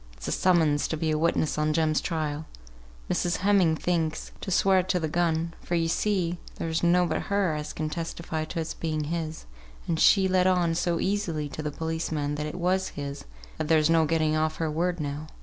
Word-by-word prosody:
It's - - -7
a - - -1
summons 160 -5 +3
to 160 - -2
be 160 0 0
a 155 - +1
witness 160 -2 +1
on 155 0 +1
Jem's 155 -1 +2
trial 155 -2 -3 0.6
Mrs. 175 - 0
Heming 190 -6 +4
thinks, 160 -2 -1
to - - -5
swear 190 0 +4
to 180 0 0
the 160 - -1
gun; 165 +1 0
for, 175 - -2
yo 165 -1 +2
see, 175 0 0 0.2
there's 165 0 -2
nobbut 175 0 +2
her 200 -5 +1
as 150 0 -4
can 155 - -3
testify 165 0 -4
to 165 - -5
its 160 0 -3
being 155 -2 -2
his, 160 0 -4 0.4
and 165 -2 0
she 195 -2 +5
let 185 0 +3
on 180 -3 +2
so 170 0 0
easily 185 -7 -1
to 155 - -6
the 150 - -2
policeman 160 -1 -2
that 150 +1 -3
it 150 - -6
was 185 +2 0
his, 140 -1 -5 0.3
that 155 - -1
there's 155 0 +4
no 165 -1 +4
getting 155 0 +1
off 155 0 0
her 160 -2 -2
word 175 +3 -1
now. 145 +1 -4
165 Hz, 200 wpm, -27 LUFS, 155-175 Hz, 0.6 s, she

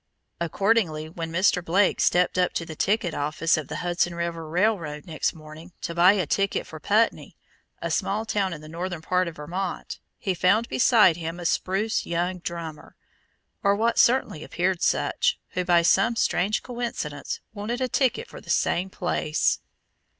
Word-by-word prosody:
Accordingly 170 -2 +1
when 165 0 -5
Mr. 180 +1 +2
Blake 190 +4 +2
stepped 180 +1 +3
up 180 - +2
to 165 - -2
the 160 - -8
ticket 195 -1 0
office 155 +3 +1
of 155 -4 -4
the - - -6
Hudson 175 0 0
River 170 -2 -4
Railroad 170 -4 0
next 160 -2 -2
morning, 155 +3 -12
to 170 - -3
buy 175 +3 +6
a 190 -4 0
ticket 195 +6 0
for 155 - -10
Putney, 215 +7 +1 0.5
a - - -2
small 210 +3 0
town 200 -3 0
in 160 -3 -6
the 155 - -11
northern 170 +1 -5
part 180 +1 +1
of 165 - -6
Vermont, 175 +5 -5 0.2
he 190 - -1
found 200 +6 +2
beside 220 -9 +5
him 165 +1 -5
a 175 - -7
spruce 195 +5 0
young 175 +2 -1
drummer, 165 -3 -7 0.7
or 200 0 +3
what 230 +2 +1
certainly 235 -11 +3
appeared 180 0 -1
such, - - +1
who 180 - -2
by 175 -1 +4
some 230 +7 +3
strange 210 -2 +1
coincidence, 235 - -4
wanted 220 +4 -3
a 255 - 0
ticket 270 - 0
for - - -11
the - - -16
same 185 +2 +1
place. 165 -4 0
180 Hz, 170 wpm, -25 LUFS, 165-205 Hz, 0.7 s, buy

